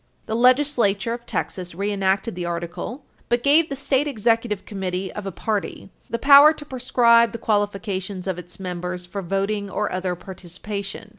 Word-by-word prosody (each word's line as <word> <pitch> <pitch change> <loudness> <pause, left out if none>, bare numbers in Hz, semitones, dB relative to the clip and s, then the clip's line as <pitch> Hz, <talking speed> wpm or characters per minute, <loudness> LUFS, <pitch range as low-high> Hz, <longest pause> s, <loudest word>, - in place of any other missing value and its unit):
The 220 - -3
legislature 240 -4 +3
of 235 0 -8
Texas 180 -3 -4
reenacted 195 +2 0
the 175 0 -5
article, 175 - -5 0.2
but 240 0 +1
gave 305 +3 +4
the 275 - -3
State 275 +1 0
Executive 225 -4 0
Committee 190 -2 -4
of 210 -2 -6
a - - -3
party 205 0 -3 0.2
the 235 - -1
power 280 +4 +8
to 295 - -9
prescribe 235 -3 +3
the - - -3
qualifications 200 -3 -2
of 185 -2 -2
its 180 +2 -11
members 180 -1 -5
for 195 +3 -5
voting 195 +2 -2
or 210 +2 -2
other 185 -1 -2
participation. 190 +3 -7
205 Hz, 160 wpm, -23 LUFS, 185-235 Hz, 0.2 s, power